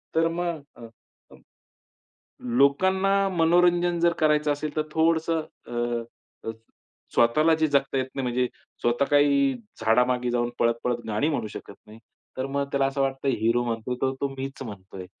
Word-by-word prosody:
तर 165 +1 +3
मग 170 -4 -3
अ, 115 -1 -11 0.4
अ, - - -15 1.2
लोकांना 190 +8 +3 0.3
मनोरंजन 175 +1 +3
जर 170 0 +4
करायचं 150 -1 +3
असेल 145 +1 -4
तर 155 - +2
थोडंसं 160 0 +2 0.3
अ, - - -10 0.8
अ, - - -2 0.6
स्वतःला 155 +8 +4
जे 160 0 +2
जगता 140 -1 +1
येत 130 - -1
नाही, 135 - -3
म्हणजे 125 0 0 0.4
स्वतः 120 +3 +2
काही 140 -2 +4 0.3
झाडामागे 125 +2 +2
जाऊन 120 0 0
पळत, 115 0 +3
पळत 125 -1 +1
गाणी 110 +8 0
म्हणू 135 -8 -1
शकत 100 - -9
नाही, 110 +1 -13 0.4
तर 130 - -1
मग 140 +1 -1
त्याला 140 -1 +2
असं 135 +1 -3
वाटतं 135 0 -1
हीरो 120 -1 +1
म्हणतोय 115 +1 -3
तर 130 0 +2
तो 140 - 0
मीच 135 +1 -5
म्हणतोय. 95 -5 -9
135 Hz, 160 wpm, -25 LUFS, 120-160 Hz, 1.2 s, जर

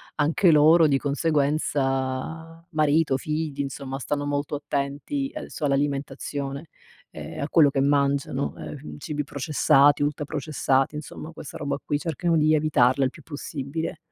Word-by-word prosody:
anche 160 +4 +3
loro, 155 +1 +6
di 140 - +3
conseguenza, 145 +1 -1
marito, 155 -2 +2
figli, 150 0 -3
insomma, 135 -1 -5
stanno 145 +2 -2
molto 145 0 -2
attenti 145 - -3
adesso 300 - -5
all'alimentazione 140 +1 -2 0.4
e - - -8
a 140 - -2
quello 155 -4 +6
che 135 -1 0
mangiano. 140 -1 +1
Ehm, 150 +1 -8
cibi 150 0 -3
processati, 145 0 +3
ultra 145 0 0
processati, 145 -2 0
insomma, 155 +1 -7
questa 155 - -9
roba 140 -1 -2
qui, 145 - -1
cercano 165 +2 0
di 155 +1 +4
evitarla 140 -3 +3
il 130 - +2
più 160 - -14
possibile. 150 +1 -5
145 Hz, 135 wpm, -25 LUFS, 140-155 Hz, 0.4 s, loro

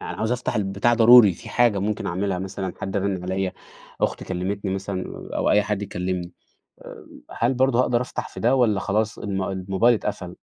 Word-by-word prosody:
يعني - - -6
عاوز 110 +2 -1
أفتح 125 0 -2
البتاع 100 +3 +1
ضروري 115 -3 +8
في - - -12
حاجة 120 -4 +2
ممكن 105 +2 -2
أعملها 95 +1 -1
مثلًا، 95 0 -5
حد 95 - -3
رانن 95 -2 -1
عليّا، 95 +1 -2 0.5
أختي - - -1
كلمتني 95 +2 -3
مثلًا 95 -1 -4 0.3
أو - - +1
أي 105 - +4
حد 105 -1 -2
يكلمني 90 -2 -4 0.5
آآ - - -11 0.3
هل 120 +3 0
برضو 130 -1 +2
هاقدر 125 -1 +2
أفتح 125 - -5
في - - -10
ده 120 +4 +3
والّا 115 -6 +2
خلاص 105 +2 -1
الم 95 -2 -3
الموبايل 95 +5 +1
اتقفل؟ 95 -4 -5
100 Hz, 185 wpm, -23 LUFS, 95-115 Hz, 0.5 s, ضروري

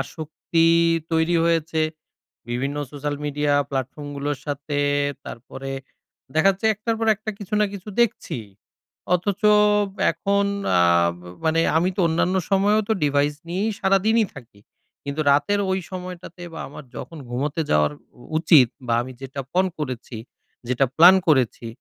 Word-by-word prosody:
আসক্তি 160 +1 -2 0.5
তৈরি 160 +1 +2
হয়েছে, 165 -1 +1 0.7
বিভিন্ন 135 +4 -2 0.2
সোশ্যাল 145 0 -3
মিডিয়া 145 0 0 0.2
প্ল্যাটফর্মগুলোর 145 +2 -4
সাথে, 145 0 -3 0.5
তারপরে 135 +3 -8 0.6
দেখা 160 +5 +4
যাচ্ছে 195 +3 -6
এক 210 - -19
টার 230 -1 +1
পর 225 - 0
একটা 220 +2 -6
কিছু 205 0 -8
না 210 - +4
কিছু 200 +1 -8
দেখছিই। 135 - -2 0.6
অথচ 185 +2 0 0.7
এখন 200 +5 0 0.3
আব 85 0 +3 0.3
মানে 160 +1 +2 0.2
আমি 175 +3 +2
তো - - -5
অন্যান্য 175 +3 +1 0.2
সময়েও 205 +2 +3
তো - - +4
ডিভাইস 145 0 +1
নিয়েই 195 +6 -1
সারাদিনই 205 +4 +3
থাকি; 120 -6 -13 0.4
কিন্তু 140 +2 -3
রাতের 150 +9 +2
ওই 190 - +1
সময়টাতে 180 -1 -8
বা 160 - -7
আমার 145 - -10
যখন 165 - -8
ঘুমোতে 140 +6 -2
যাওয়ার 75 - +3 0.5
উচিত 155 -6 +6 0.2
বা 120 - +1
আমি 130 +2 -7
যেটা 135 +1 -5
পণ 185 +1 +3
করেছি, 130 -4 -5 0.5
যেটা 125 +2 +2
প্ল্যান 175 +4 +9
করেছি, 130 -6 +2
155 Hz, 140 wpm, -23 LUFS, 140-185 Hz, 0.7 s, প্ল্যান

